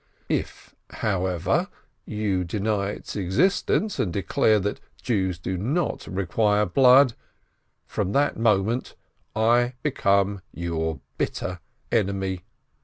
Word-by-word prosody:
"If, - - -3 0.2
however, 95 - 0 0.4
you 105 -4 -1
deny 100 +2 -1
its 105 - -7
existence, 160 - +1
and 90 - 0
declare 100 +4 +2
that 105 +2 -2 0.2
Jews 95 -7 0
do 90 +2 -3
not 145 - -1
require 105 +3 +1
blood, 130 +5 +6 0.7
from 100 -2 -2
that 145 +1 +2
moment 110 +2 +1 0.4
I 120 +3 +3
become 100 -8 +1
your 80 -4 -3 0.2
bitter 90 0 -2 0.3
enemy. 95 -4 0
100 Hz, 105 wpm, -25 LUFS, 95-115 Hz, 0.7 s, blood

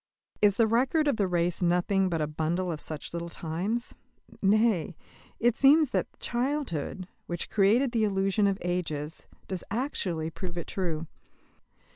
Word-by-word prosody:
Is 205 -2 +5
the 230 - +4
record 260 +7 +2
of 280 -6 +2
the 200 - +2
race 175 0 0
nothing 180 +2 +2
but 165 -2 -1
a - - +2
bundle 160 +4 -1
of 155 - -4
such 155 0 -5
little 170 0 -4
times? 180 +10 -3 0.5
Nay, 205 -5 +3 0.4
it 240 0 +3
seems 285 0 +5
that - - 0
childhood, 240 - -2 0.2
which 175 -1 -4
created 220 +6 +3
the 230 -2 +1
illusion 195 0 +2
of 195 -1 +1
ages, 165 -4 -3 0.2
does 185 -3 -4
actually 180 - -2
prove 175 +1 -6
it 170 - -3
true. 165 -4 -2
190 Hz, 150 wpm, -28 LUFS, 170-230 Hz, 0.5 s, Is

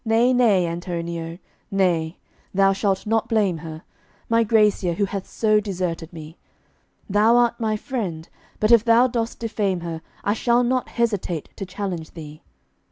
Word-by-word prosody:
Nay, 235 +2 +3
nay, 215 -8 +4
Antonio! 170 -1 -4 0.3
nay, 175 -4 +1 0.4
thou 195 0 +4
shalt 195 -1 -1
not 225 +1 0
blame 200 -7 +1
her, 160 +1 -8 0.5
My 230 0 +4
Gracia, 210 -5 +2
who 200 +4 0
hath 195 -1 -5
so 215 -1 +2
deserted 180 -5 -3
me. 160 -1 -11 0.7
Thou 215 +3 +4
art 240 0 +2
my 215 -2 0
friend, 195 - -4 0.3
but 215 +2 +2
if 230 -2 +7
thou 235 +1 +5
dost 235 -2 -2
defame 205 -5 -1
her 165 -1 -5 0.2
I 205 - +1
shall 240 +2 +2
not 255 +1 0
hesitate 205 -9 -2
to 195 - -6
challenge 185 -4 -5
thee. 155 -2 -10
200 Hz, 155 wpm, -23 LUFS, 170-225 Hz, 0.7 s, if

